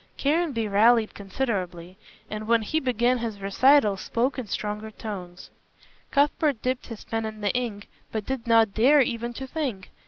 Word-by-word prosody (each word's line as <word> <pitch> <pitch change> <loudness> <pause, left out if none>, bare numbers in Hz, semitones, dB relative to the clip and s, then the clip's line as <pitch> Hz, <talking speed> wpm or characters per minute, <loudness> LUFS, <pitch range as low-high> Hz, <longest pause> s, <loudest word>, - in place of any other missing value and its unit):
Caranby 285 -6 0
rallied 220 +2 +4
considerably, 190 -5 -4 0.3
and 215 0 -6
when 230 -1 +3
he 310 +9 0
began 250 -2 +1
his 225 -3 -4
recital 210 +2 +4
spoke 250 +7 -1
in 245 - -5
stronger 210 +1 -4
tones. 185 -5 -8 0.6
Cuthbert 290 -2 +2
dipped 255 0 -2
his 230 -3 -8
pen 225 0 -3
in 215 -1 -6
the 205 - 0
ink, 230 -5 -3 0.2
but 215 -2 -3
did 260 -3 -4
not 225 -3 +4
dare 275 +6 +5
even 235 -1 -1
to 265 +3 -6
think. 260 - -4
230 Hz, 160 wpm, -25 LUFS, 210-255 Hz, 0.6 s, dare